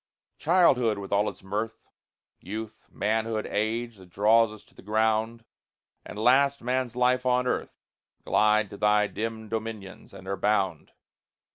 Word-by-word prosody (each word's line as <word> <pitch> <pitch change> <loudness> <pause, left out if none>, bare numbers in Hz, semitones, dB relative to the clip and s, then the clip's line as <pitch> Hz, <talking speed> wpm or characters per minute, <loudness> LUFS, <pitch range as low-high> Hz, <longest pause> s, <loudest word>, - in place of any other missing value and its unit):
Childhood, 135 - +3
with 100 -1 -8
all 100 +1 +2
its - - -13
mirth, 105 +4 -4 0.5
Youth, 110 +3 -8
Manhood, 110 +1 -1
Age, 115 +2 -2
that 95 -1 -16
draws 110 +4 +3
us 105 -1 -12
to - - -26
the - - -15
ground, 110 +2 0 0.6
And - - -10
last, 135 +4 +3
Man's 125 -1 -1
Life 125 0 +2
on 125 0 +2
earth, 125 - -2 0.5
Glide 105 -1 +2
to 100 - -8
thy 105 0 +3
dim 110 +1 -5
dominions, 110 -3 -6
and 95 - -12
are 100 0 -2
bound. 95 -5 0
110 Hz, 145 wpm, -27 LUFS, 105-115 Hz, 0.6 s, Childhood